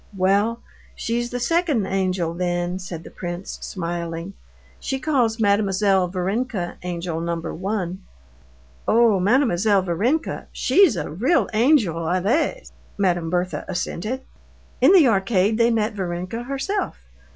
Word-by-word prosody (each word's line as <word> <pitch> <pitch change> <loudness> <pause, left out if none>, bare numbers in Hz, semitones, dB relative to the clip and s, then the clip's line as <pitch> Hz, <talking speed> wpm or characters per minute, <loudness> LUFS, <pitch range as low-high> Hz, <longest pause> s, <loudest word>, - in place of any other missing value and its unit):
"Well, 200 +5 +2 0.3
she's 240 +1 -2
the 245 - -3
second 305 - +1
angel, 185 -3 -1
then," 175 +1 -2
said 175 -3 -7
the - - -11
prince, 175 +1 -6
smiling. 170 0 -4 0.5
"she 270 - -3
calls 245 -7 +1
Mademoiselle 200 -2 +2
Varenka 190 +1 -2
angel 170 -2 -3
number 170 0 -3
one." 190 0 -3 0.9
"Oh! 225 -3 +4
Mademoiselle 205 -2 +3
Varenka, 220 - -1
she's 385 - +4
a 170 - -4
real 255 - +2
angel, 215 - +2
allez," 230 - 0 0.3
Madame 175 -4 +1
Berthe 180 -3 -1
assented. 210 +7 -3 0.6
In - - +7
the 355 -8 +7
arcade 200 0 +2
they 230 0 +5
met 225 -1 0
Varenka 185 +3 -4
herself. 275 +10 -2
195 Hz, 120 wpm, -22 LUFS, 175-235 Hz, 0.9 s, In